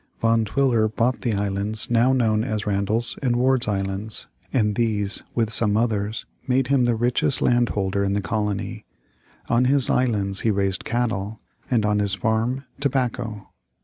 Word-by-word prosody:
] - - -40
Van 115 0 +2
Twiller 120 -1 +2
bought 115 +4 0
the 115 -4 0
islands 100 +2 -2
now 120 +2 +4
known 110 -4 +2
as 110 -4 -3
Randall's 105 +4 0
and 125 -4 +1
Ward's 125 0 +2
Islands, 100 +1 -1 0.3
and 105 -5 +1
these, 105 -3 0
with 115 -2 0
some 105 -2 +3
others, 110 - -1 0.2
made 130 0 +1
him 135 -3 +3
the 120 -1 +2
richest 120 +3 +1
landholder 100 -5 +1
in 100 0 0
the 100 - +1
colony. 105 -1 -3 0.6
On 120 +2 +2
his 135 0 +4
islands 105 -6 0
he 115 - 0
raised 100 -2 -1
cattle, 110 -3 -2 0.3
and 115 -4 +2
on 105 0 +1
his 100 -1 0
farm 115 +6 -1
tobacco. 125 -6 -2
110 Hz, 160 wpm, -23 LUFS, 105-120 Hz, 0.6 s, now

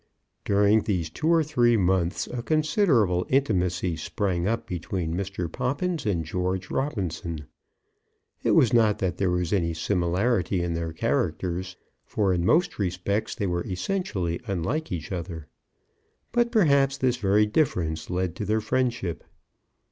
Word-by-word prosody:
During 100 +2 +4
these 90 -6 -2
two 155 - -3
or 165 -1 +4
three 120 -6 +3
months 90 -2 +1
a 125 - -5
considerable 150 - +2
intimacy 90 -9 +1
sprang 90 -2 -1
up 115 +2 -1
between 90 -1 -3
Mr. 95 -1 -3
Poppins 145 - -2
and 85 -6 0
George 90 +3 -2
Robinson. 90 - -3 1.0
It - - +2
was 125 - +4
not 110 -3 +4
that 95 -2 -2
there 95 -2 +1
was 90 0 0
any 85 -4 +1
similarity 90 +2 0
in 85 -1 -1
their 85 0 -3
characters, 90 +3 -1 0.3
for 100 -3 0
in 85 -1 0
most 160 - +2
respects 95 +2 -1
they 105 - -2
were 85 -2 -1
essentially 95 - -2
unlike 110 - -2
each 85 -2 -4
other. 85 -3 -5 0.9
But, 240 0 +2
perhaps, 140 - +3
this 125 -2 +1
very 105 -1 +3
difference 90 - 0
led 90 -1 -1
to 105 - -3
their 110 +2 +1
friendship. 120 -7 -1
95 Hz, 140 wpm, -26 LUFS, 90-120 Hz, 1.0 s, During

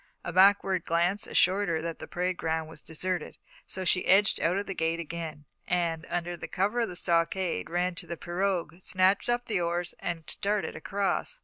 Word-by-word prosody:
A 175 - -4
backward 190 -1 +5
glance 175 +5 +1
assured 195 +2 +3
her 165 -1 +1
that 165 -1 -4
the - - -7
parade 180 +1 -1
ground 160 -1 -1
was 160 - -12
deserted, 175 +1 -3 0.3
so 190 0 -1
she 180 +1 +2
edged 195 +1 +5
out 175 +3 +1
of 200 - -2
the 195 - -4
gate 165 -1 0
again, 160 -2 -6 0.2
and, 170 -2 0
under 175 0 -2
cover 195 +8 -1
of 230 - +1
the 180 - -7
stockade, 170 - 0
ran 180 +1 0
to 170 - -7
the 170 - -5
pirogue, 175 -2 -1
snatched 185 +4 +2
up 240 0 +1
the 200 -5 0
oars, 175 +1 -1
and 165 -2 -4
started 205 0 0
across. 200 - -1
175 Hz, 190 wpm, -29 LUFS, 165-195 Hz, 0.3 s, backward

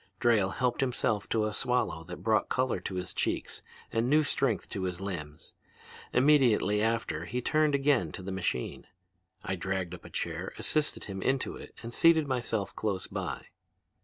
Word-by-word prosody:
Drayle 110 -5 +4
helped 125 +1 +1
himself 120 -5 0
to 110 -2 +2
a 105 - -2
swallow 105 -9 0
that 90 +1 -8
brought 110 0 +2
color 130 -1 +1
to 95 - -5
his 90 0 -4
cheeks - - -2 0.3
and 115 +2 +1
new 155 +2 +5
strength 135 -5 +1
to 95 -2 -3
his 90 -1 -3
limbs. 80 -7 -6 0.6
Immediately 125 -7 +4
after 110 -8 0
he 125 - -2
turned 155 +3 +2
again 140 -1 +2
to 95 - -6
the 95 - -4
machine. 85 -9 -2 0.6
I 95 - -1
dragged 95 -1 -2
up 85 - -9
a - - -10
chair, - - -3
assisted 155 -1 0
him 95 -1 -5
into 135 +4 0
it, - - -11
and 115 +1 -6
seated 160 0 +5
myself 120 -6 -1
close 100 -4 -1
by. - - -4
110 Hz, 170 wpm, -30 LUFS, 95-130 Hz, 0.6 s, new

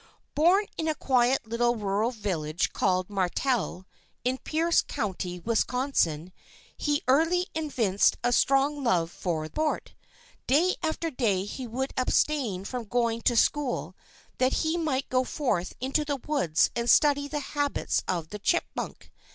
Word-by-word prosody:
Born 360 +7 +4
in 320 - -1
a 310 - +1
quiet 255 -2 +2
little 240 +1 +1
rural 210 +1 0
village 180 -9 -2
called 185 -2 +1
Martelle, 195 0 -1 0.4
in 255 +1 0
Pierce 330 +2 +2
county, 185 -7 -4
Wisconsin, 220 - 0 0.4
he 295 -1 -1
early 330 +7 +3
evinced 245 -11 +1
a 245 - +2
strong 275 +3 +2
love 175 -8 +1
for 165 -4 -3
sport. 305 - -2 0.5
Day 335 +8 +3
after 325 0 -2
day 210 -8 0
he 250 +4 -6
would 260 +4 -3
abstain 255 -7 +1
from 245 +1 -4
going 230 0 0
to 240 - +2
school 275 +2 +1 0.4
that 255 +1 +3
he 315 +1 +1
might 305 -6 -1
go 255 0 +1
forth 240 - -2
into 270 +4 0
the 290 -1 -2
woods 230 - +2
and 235 0 -1
study 285 -1 +4
the 295 0 -3
habits 290 -1 0
of 170 -4 -2
the 210 - -7
chipmunk. 345 - -2
250 Hz, 145 wpm, -27 LUFS, 200-290 Hz, 0.5 s, Born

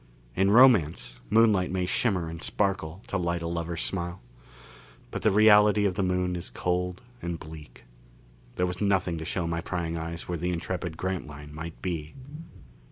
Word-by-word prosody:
In 95 +1 +3
romance, 85 - +5
moonlight 110 -5 +4
may 90 0 -1
shimmer 90 -3 +1
and 80 0 -7
sparkle 95 -3 -1
to 100 - -2
light 85 -1 -1
a - - -2
lover's 85 0 -3
smile; 90 -1 -3 0.9
but - - -4
the - - +4
reality 105 0 +6
of 95 - +2
the 95 - -1
Moon 90 -1 0
is 85 - -5
cold 90 +6 -2 0.2
and 85 -1 -4
bleak. 75 -1 -11 0.7
There 90 - +1
was 90 +1 -4
nothing 90 -4 +1
to 80 - -6
show 90 +1 -2
my 85 0 -2
prying 85 -4 -3
eyes 85 +1 -5
where 85 -2 -3
the 90 +2 -1
intrepid 85 -1 -3
Grantline 75 -6 -5
might 80 +2 -7
be. 80 -5 -4
90 Hz, 165 wpm, -27 LUFS, 85-95 Hz, 0.9 s, reality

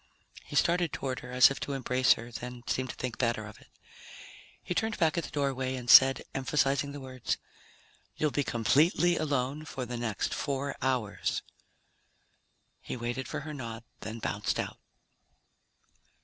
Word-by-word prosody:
He - - -8
started 175 -1 +3
toward 130 -2 -3
her, 125 - -10
as 125 +1 +7
if 135 - -4
to 140 - -3
embrace 130 -1 +3
her, 120 +1 -9
then 120 +1 -7
seemed 130 0 -1
to - - -5
think 125 -3 -5
better 115 -3 0
of 110 - -12
it. - - -19 1.0
He - - -2
turned 220 +4 -1
back 160 -2 +2
at 170 - -1
the - - -8
doorway 135 -2 -1
and 120 -2 0
said, 135 0 +8
emphasizing 135 +1 +1
the 145 - -7
words, 130 -2 -3 0.8
"You'll 150 -1 +1
be 145 - 0
completely 155 - +3
alone 145 -1 -1
for 135 -4 -5
the 120 0 -5
next 115 -4 -2
four 140 -1 -2
hours." 125 -6 -1 1.4
He - - -5
waited 120 +2 -3
for - - -4
her 155 +1 -6
nod, 115 -4 -6 0.2
then 110 +2 -6
bounced 115 - -2
out. - - -4
130 Hz, 165 wpm, -30 LUFS, 120-145 Hz, 1.4 s, said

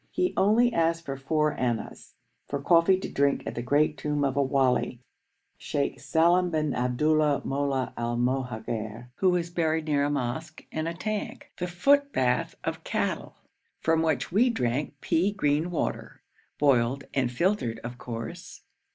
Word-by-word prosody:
He 360 0 0
only 235 +5 +4
asked 165 -1 +1
for 135 - -3
four 150 +3 0
annas 120 -3 -3 0.3
for 140 - -3
coffee 170 +5 +4
to - - -4
drink 140 0 +1
at - - -4
the 120 - -4
great 145 +3 +1
tomb 150 +1 -1
of 135 -2 0
a 140 - +3
wali, 130 -2 +1 0.6
Sheikh 140 -1 -2
Salem 175 +2 +3
bin 155 -4 0
Abdullah 150 +4 +2
Mollah 135 -2 -1
el 120 0 -2
Mohagher, 120 -2 -3
who 185 -2 +3
is 170 -1 -2
buried 160 -2 0
near 145 -2 +1
a 145 - +1
mosque 145 +4 -3
and 155 +1 -2
a 165 - -3
tank, 215 +4 -4
the 180 - -2
footbath 180 - +2
of - - -3
cattle, - - -2 0.4
from 160 0 +2
which 155 -4 0
we 230 +7 +4
drank 140 - -2
pea 180 +5 +2
green 155 -4 0
water, 175 - -3 0.3
boiled 135 -1 +2
and 130 -3 +1
filtered 170 - 0
of 120 +1 -7
course. 115 -2 -7
145 Hz, 155 wpm, -27 LUFS, 125-170 Hz, 0.6 s, only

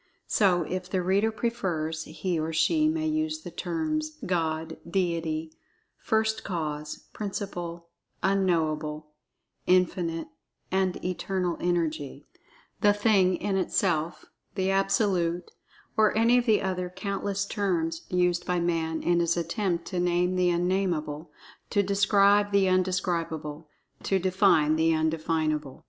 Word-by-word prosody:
So, 180 -5 +3
if 185 +3 -4
the[Pg 190 - -1
19] - - -5
reader 200 +4 +3
prefers, 180 -9 -2
he, 180 -4 -2
or 160 +1 -2
she, 310 - +3
may 315 0 -1
use 315 0 -1
the - - -7
terms: 310 -1 -2
"God"; 160 -2 -1
"Deity"; 165 -3 -1 0.5
"First 220 0 0
Cause"; 150 -4 -4
"Principle"; 175 -5 -5 0.4
"Unknowable"; 155 -5 0 0.6
"Infinite 175 - +1 0.4
and 190 -1 0
Eternal 180 -1 -1
Energy"; 160 -5 -2 0.5
"The 205 0 +5
Thing 205 -3 +3
in 195 +2 -1
Itself"; 170 -3 0 0.3
"The 190 -1 +1
Absolute"; 195 -3 +1 0.4
or 215 0 +3
any 235 +2 +5
of 245 - -3
the 215 -2 +3
other 180 -1 -2
countless 200 +1 -3
terms 170 -6 -1
used 180 -1 +1
by 180 -1 0
Man 165 -2 -1
in 175 0 +2
his 170 0 +1
attempt 170 0 -1
to 185 - -2
name 180 +1 +1
the 180 -1 +3
Un 175 +1 +1
Nameable—to 175 +1 -2
describe 200 +1 +3
the 200 -1 +4
Un 185 0 +4
Describable—to 165 -2 -3
define 185 -5 +3
the 160 0 +3
Un 160 0 +1
Definable. 155 -3 -2
180 Hz, 130 wpm, -27 LUFS, 165-200 Hz, 0.6 s, The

